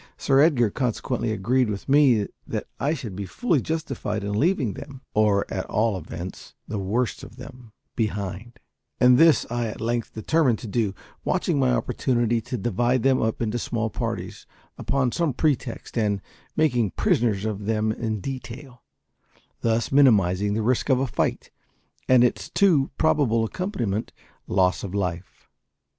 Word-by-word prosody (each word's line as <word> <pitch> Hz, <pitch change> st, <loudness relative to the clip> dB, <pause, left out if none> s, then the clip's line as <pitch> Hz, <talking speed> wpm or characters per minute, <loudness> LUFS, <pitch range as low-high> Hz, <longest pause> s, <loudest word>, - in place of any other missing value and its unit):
Sir 135 Hz, 0 st, +2 dB
Edgar 135 Hz, -8 st, +4 dB
consequently 120 Hz, -1 st, -1 dB
agreed 120 Hz, +4 st, +1 dB
with 100 Hz, -2 st, -5 dB
me 135 Hz, -7 st, +4 dB, 0.2 s
that -, -, -3 dB
I 150 Hz, +3 st, +1 dB
should 115 Hz, -, -7 dB
be 100 Hz, 0 st, -5 dB
fully 165 Hz, -, 0 dB
justified 135 Hz, -10 st, -3 dB
in 100 Hz, -, -3 dB
leaving 130 Hz, -, +1 dB
them 140 Hz, +3 st, -10 dB
or, 105 Hz, -2 st, +3 dB
at 95 Hz, -, -3 dB
all 110 Hz, -1 st, +1 dB
events, 85 Hz, +1 st, -8 dB
the 105 Hz, -, -3 dB
worst 110 Hz, +6 st, -1 dB
of -, -, -11 dB
them 125 Hz, -2 st, -12 dB, 0.2 s
behind; 105 Hz, +1 st, -3 dB, 0.4 s
and 125 Hz, +1 st, +6 dB
this 165 Hz, -7 st, +5 dB
I 120 Hz, -1 st, -1 dB
at 105 Hz, -, -7 dB
length 115 Hz, 0 st, -2 dB
determined 130 Hz, +1 st, +2 dB
to 115 Hz, -, -8 dB
do; 105 Hz, -2 st, -1 dB, 0.3 s
watching 175 Hz, -5 st, 0 dB
my 130 Hz, -2 st, +3 dB
opportunity 120 Hz, -2 st, 0 dB
to 125 Hz, -, -5 dB
divide 120 Hz, +3 st, 0 dB
them 135 Hz, -1 st, +3 dB
up 110 Hz, +1 st, -1 dB
into 115 Hz, +2 st, -1 dB
small 115 Hz, -2 st, -2 dB
parties, 110 Hz, -6 st, -5 dB, 0.3 s
upon 135 Hz, -3 st, 0 dB
some 165 Hz, -1 st, 0 dB
pretext, 130 Hz, -3 st, -1 dB
and 105 Hz, -4 st, +1 dB, 0.4 s
making 125 Hz, -, +1 dB
prisoners 110 Hz, -4 st, +1 dB
of 105 Hz, -2 st, -3 dB
them 110 Hz, -1 st, +1 dB
in 110 Hz, -2 st, -3 dB
detail; 125 Hz, +1 st, -7 dB, 0.8 s
thus 115 Hz, 0 st, 0 dB
minimising 105 Hz, -7 st, +4 dB
the 110 Hz, -, -1 dB
risk 125 Hz, +4 st, +1 dB
of 130 Hz, -2 st, +4 dB
a 135 Hz, -, +1 dB
fight 125 Hz, -, -2 dB, 0.6 s
and 130 Hz, -1 st, +6 dB
its 125 Hz, -, 0 dB
too 165 Hz, -9 st, +3 dB
probable 135 Hz, -8 st, +2 dB
accompaniment, 120 Hz, -, -3 dB, 0.3 s
loss 90 Hz, -1 st, +2 dB
of 100 Hz, -1 st, -5 dB
life. 90 Hz, -2 st, -4 dB
115 Hz, 155 wpm, -24 LUFS, 105-130 Hz, 0.8 s, and